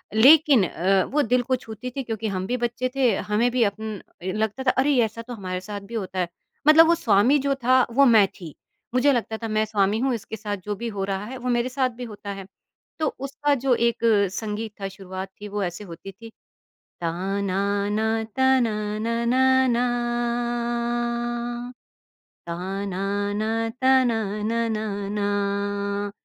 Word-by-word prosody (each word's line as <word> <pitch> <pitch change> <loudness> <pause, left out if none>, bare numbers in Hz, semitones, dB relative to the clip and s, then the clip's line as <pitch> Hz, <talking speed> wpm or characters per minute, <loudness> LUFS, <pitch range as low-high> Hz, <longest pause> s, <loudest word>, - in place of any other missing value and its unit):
लेकिन 275 -1 +7
अ, 190 +2 +2
वो 295 - +4
दिल 250 +1 +2
को 255 +1 +1
छूती 230 +1 -7
थी - - 0
क्योंकि 225 -1 -3
हम 190 -2 -2
भी 250 +3 -1
बच्चे 240 +1 -1
थे 250 -6 +3
हमें 225 +4 +3
भी 245 -1 +2
अप 200 0 -1
उम, 220 -3 -5 0.2
लगता 215 +6 -2
था 255 - +4
अरे 275 +1 +2
ऐसा 225 +1 -6
तो 245 +2 -8
हमारे 185 -4 -4
साथ 205 +1 -6
भी 235 - -11
होता 190 -3 -3
है, 180 - +1 0.4
मतलब 320 +1 +8
वो 340 - +5
स्वामी 235 0 +4
जो 275 - +2
था, 255 0 +5
वो 275 +4 +5
मैं 220 -5 +6
थी 165 -5 -9 0.4
मुझे 255 +3 +4
लगता 225 -2 -2
था 225 - -5
मैं 215 0 +1
स्वामी 205 -1 +1
हूँ, 260 0 +1
इसके 220 0 -7
साथ 205 -1 -4
जो 205 0 -2
भी 235 +4 -5
हो 200 -3 -3
रहा 195 +1 -3
है 260 +4 -7
वो 250 0 -4
मेरे 240 +1 +1
साथ 260 0 0
भी 250 - -6
होता 205 -2 -9
है। 195 -1 -8 0.5
तो 310 - +1
उसका 280 +2 0
जो 260 - +4
एक 235 0 +1 0.4
संगीत 215 +1 -4
था 195 - -2
शुरुआत 190 0 -7
थी 210 - -6
वो 205 0 -2
ऐसे 175 +3 -4
होती 185 +1 -9
थी। 225 +4 -12 0.7
ता 170 -1 -1 0.3
नाना 200 +2 0 0.3
ताना 225 -6 +2
नाना 235 +3 +1 0.2
ना, 240 0 +2 2.6
ता 185 +4 -4
नाना 200 +2 -2 0.3
ताना 260 -3 +4 0.2
नाना 225 -1 -1 0.2
ना। 200 0 -1
220 Hz, 170 wpm, -24 LUFS, 200-245 Hz, 2.6 s, मतलब